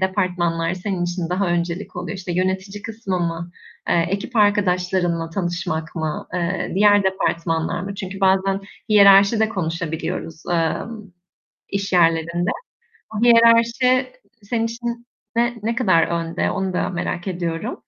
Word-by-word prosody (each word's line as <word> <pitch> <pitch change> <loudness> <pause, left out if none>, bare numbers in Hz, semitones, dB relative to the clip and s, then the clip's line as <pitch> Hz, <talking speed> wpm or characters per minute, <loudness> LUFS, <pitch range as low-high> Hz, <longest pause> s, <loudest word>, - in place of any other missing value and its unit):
departmanlar 180 -3 0
senin 185 -1 -3
için 175 -1 -3
daha 190 +1 0
öncelik 175 +3 -2
oluyor? 180 +1 -4
İşte, 180 -2 -5
yönetici 190 +3 -2
kısmı 215 -4 -3
mı? 170 0 -3 0.4
Eee, 170 0 +3
ekip 200 +5 -3
arkadaşlarınla 180 -5 +1
tanışmak 175 -3 -3
mı, 155 -2 -3
eee, 180 +1 -2
diğer 205 0 +5
departmanlar 170 -3 -1
mı? 195 +1 -5
Çünkü 195 -1 -6
bazen 195 +1 +2 0.3
hiyerarşi 200 +1 +6
de 220 - +3
konuşabiliyoruz, 165 -3 -4
emm, 205 +6 -1 0.6
iş 200 -1 -3
yerlerinde. 170 +1 +2 0.6
Bu 210 - -3
hiyerarşi 235 - +4 0.3
senin 225 +2 -1
için 235 +1 -5 0.3
ne 235 +1 +2
ne 230 +1 -1
kadar 185 -9 +3
önde? 170 -1 -1
Onu 190 -1 -2
da - - 0
merak 175 0 -3
ediyorum. 170 -3 -3
185 Hz, 130 wpm, -21 LUFS, 170-205 Hz, 0.6 s, hiyerarşi